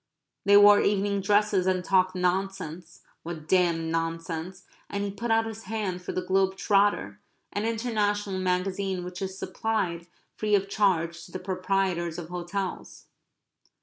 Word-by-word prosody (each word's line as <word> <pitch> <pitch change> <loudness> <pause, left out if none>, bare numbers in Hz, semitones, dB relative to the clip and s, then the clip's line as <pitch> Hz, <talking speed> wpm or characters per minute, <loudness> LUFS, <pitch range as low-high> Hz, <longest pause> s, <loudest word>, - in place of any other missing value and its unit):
They 200 0 +7
wore 205 0 +8
evening 200 0 +1
dresses, 205 -1 +2
and 185 -1 +1
talked 185 -1 +3
nonsense 180 -2 -2 0.2
what 160 -2 -7
damned 170 -3 +2
nonsense 165 +2 -3 0.3
and 200 0 -2
he 200 - -2
put 215 +4 -5
out 225 0 +3
his 225 -1 -7
hand 195 -4 -3
for 180 - -5
the 185 - -2
Globe 190 0 +2
Trotter, 195 - +2 0.3
an 205 +2 -1
international 210 -4 -1
magazine 185 0 -1
which 180 +1 -7
is 190 0 -4
supplied 185 -6 -2 0.3
free 210 -1 +1
of 195 -1 +1
charge 170 -5 +1
to - - -15
the - - -4
proprietors 185 -2 -1
of 170 -2 -7
hotels. 180 +2 -5
190 Hz, 150 wpm, -27 LUFS, 180-205 Hz, 0.3 s, wore